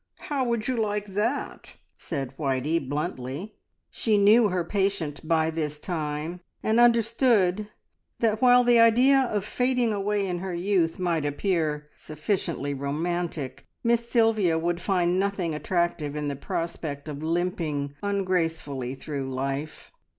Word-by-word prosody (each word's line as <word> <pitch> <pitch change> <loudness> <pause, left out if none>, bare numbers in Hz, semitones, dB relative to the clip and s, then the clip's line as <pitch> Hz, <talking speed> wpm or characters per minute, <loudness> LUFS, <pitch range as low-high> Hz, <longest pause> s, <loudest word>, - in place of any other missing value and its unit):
How 280 -3 -2
would 235 -2 -1
you 255 -2 0
like 210 -2 -1
that?" 210 +7 -3 0.2
said 135 -5 -5
Whitey 140 +3 0
bluntly. 145 +5 -4 0.4
She 215 -2 +2
knew 210 +2 +6
her 180 -2 0
patient 185 -6 -2
by 160 -1 +2
this 150 -2 -3
time, 155 +1 -4 0.2
and 220 +2 +2
understood 230 -4 +3 0.5
that 220 -1 +1
while 250 -1 +6
the 240 -1 +5
idea 245 +4 +6
of 210 -6 -1
fading 250 -2 +1
away 205 0 0
in 180 -2 -2
her 185 -1 -4
youth 175 -2 +1
might 170 -4 0
appear 150 -1 -1
sufficiently 155 -2 -2
romantic, 150 0 -3 0.2
Miss 235 0 +1
Sylvia 220 -8 +3
would 170 +1 -1
find 180 -2 +1
nothing 195 -4 -1
attractive 160 -2 -1
in 150 -1 -2
the 140 - -3
prospect 150 0 -4
of 145 -1 -6
limping 160 -4 -1
ungracefully 165 -10 -1
through 135 -1 -5
life. 135 +3 -4
175 Hz, 135 wpm, -26 LUFS, 150-210 Hz, 0.5 s, knew